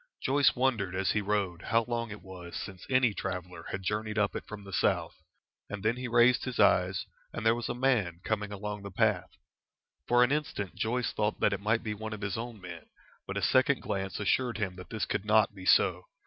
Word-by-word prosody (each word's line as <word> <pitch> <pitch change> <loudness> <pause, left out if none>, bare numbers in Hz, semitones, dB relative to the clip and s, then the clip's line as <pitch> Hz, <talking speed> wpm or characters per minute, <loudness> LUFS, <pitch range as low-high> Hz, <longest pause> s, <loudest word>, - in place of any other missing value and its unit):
Joyce 140 +1 +4
wondered 115 -8 0
as 95 0 +1
he 105 - +1
rode 100 -4 -1
how 115 +1 +2
long 115 -1 -2
it 105 0 -9
was 90 -2 -9
since 95 -2 -7
any 130 -4 +3
traveller 90 -3 -5
had 95 - -4
journeyed 105 +2 -2
up 105 -1 +1
it - - -5
from 105 -1 -8
the 100 -1 -10
south, - - +1 0.6
and 105 -1 -6
then 110 +2 +2
he 125 0 -4
raised 120 +1 +4
his 125 -2 -4
eyes, 95 -3 +3 0.3
and - - -5
there 115 - +6
was 120 0 -4
a 120 - -2
man 120 -10 +1
coming 105 -1 -2
along 105 0 -5
the 100 - -7
path. 95 - +1 0.8
For 120 0 +5
an 125 - +2
instant 145 -10 -2
Joyce 120 +2 -1
thought 105 0 -1
that 100 - +3
it 100 - -3
might 110 +2 +1
be 110 - -2
one 110 +1 -6
of 105 - -7
his 100 -2 -2
own 115 -1 -5
men, 85 -3 -9 0.4
but - - -4
a - - -2
second - - +3
glance 95 -1 -3
assured 120 +4 +1
him 100 -4 -2
that 90 -1 -10
this 110 -2 -2
could - - -2
not 110 -1 +3
be 95 -2 -9
so. - - +4
105 Hz, 220 wpm, -30 LUFS, 95-115 Hz, 0.8 s, there